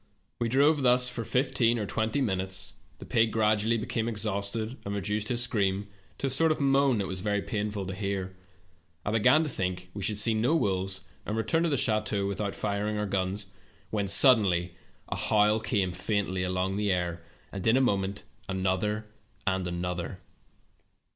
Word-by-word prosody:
"We 120 -1 0
drove 145 +4 +4
thus 125 -1 +4
for 120 -1 -3
fifteen 120 -1 +2
or 105 - -2
twenty 110 +6 -1
minutes. 95 -4 -1 0.2
The - - -10
pig 115 -1 +2
gradually 110 +1 +2
became 110 +1 -2
exhausted, 110 +2 -2
and 100 0 -4
reduced 105 +2 -1
his 120 0 +1
scream 100 -4 0 0.3
to - - -3
a - - +1
sort 160 +5 +3
of 155 - -1
moan 135 -2 +3
that 100 -2 -1
was 95 0 -3
very 105 0 0
pain 105 +1 -2
ful 100 -2 -4
to 95 - -4
hear. 95 -1 -3 0.7
I 105 - 0
began 125 +8 +4
to 155 - -2
think 90 -5 -3
we 100 - -6
should 105 +2 -1
see 110 +2 +3
no 115 +9 +2
wolves, 95 - -1 0.2
and 105 - -3
return 110 +9 +1
to 170 - +2
the 140 - +1
chateau 110 -4 0
without 100 0 -2
firing 105 +1 -1
our 105 - -1
guns, 95 0 -2 0.4
when 100 -2 -1
suddenly 95 -6 +5 0.3
a - - -3
howl 105 0 +3
came 100 -4 0
faintly 95 0 -1
along 90 +1 -1
the 105 -1 +1
air, 85 -2 -1 0.3
and 100 0 -4
in 115 +3 +5
a - - +4
moment, 100 -5 0 0.3
another 95 +3 -1 0.4
and 95 -2 0
another. 90 0 -3
105 Hz, 180 wpm, -28 LUFS, 95-115 Hz, 0.7 s, suddenly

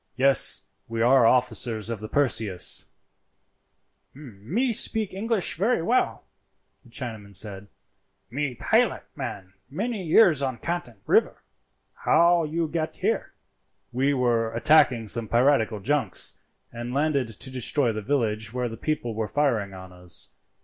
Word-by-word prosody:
"Yes, 135 +1 +4 0.2
we 115 0 -2
are 125 -1 +5
officers 120 -3 +1
of 115 - -4
the 110 - -7
Perseus." 110 -9 0 1.3
"Me 145 - -3
speeke 215 -1 0
English 195 -6 -1
velly 205 0 +1
well," 245 +8 0 0.6
the 125 - -19
Chinaman 110 -5 -7
said; 100 0 -4 0.6
"me 135 0 -2
pilot - - +1
man 95 -2 -7 0.2
many 210 - -3
years 165 -3 +4
on 130 -3 -2
Canton 170 -8 -4
river. - - +2 0.5
How 170 -1 +3
you 165 +2 -2
get 160 0 -3
here?" - - -2 0.6
"We 135 +3 +1
were 120 -3 +1
attacking 125 -3 +4
some 115 +2 0
piratical 120 -2 +2
junks, 115 - 0 0.3
and 120 +2 -6
landed 140 -3 +1
to 115 +4 -4
destroy 130 0 +1
the 110 - -4
village 110 -4 -1
where 125 0 -2
the 115 - -8
people 120 -3 -3
were 110 0 -3
firing 110 -7 0
on 95 -1 -11
us. 90 -1 -3
125 Hz, 135 wpm, -25 LUFS, 110-155 Hz, 1.3 s, are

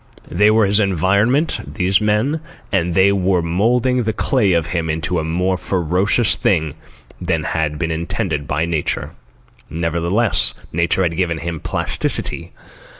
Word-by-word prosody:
They 105 +6 +4
were 110 0 +4
his 100 +2 +3
environment, 100 - +1 0.2
these 95 0 +2
men, 105 +9 +1 0.3
and 90 -4 0
they 95 +2 +5
were 95 -2 +1
moulding 120 +9 +1
the 110 -1 -1
clay 105 -7 +1
of 85 -2 +1
him 80 -2 -1
into 80 +3 -1
a - - -2
more 90 +4 0
ferocious 95 +6 +1
thing 80 -6 0 0.5
than - - -1
had 75 -2 -2
been 80 +1 -2
intended 80 -3 -3
by 75 +4 0
Nature. 80 -3 -2 0.6
Nevertheless, 85 +7 0 0.2
Nature 85 +3 +1
had 85 -2 -1
given 85 -3 0
him 85 +1 -5
plasticity. - - -2
90 Hz, 145 wpm, -18 LUFS, 85-105 Hz, 0.6 s, they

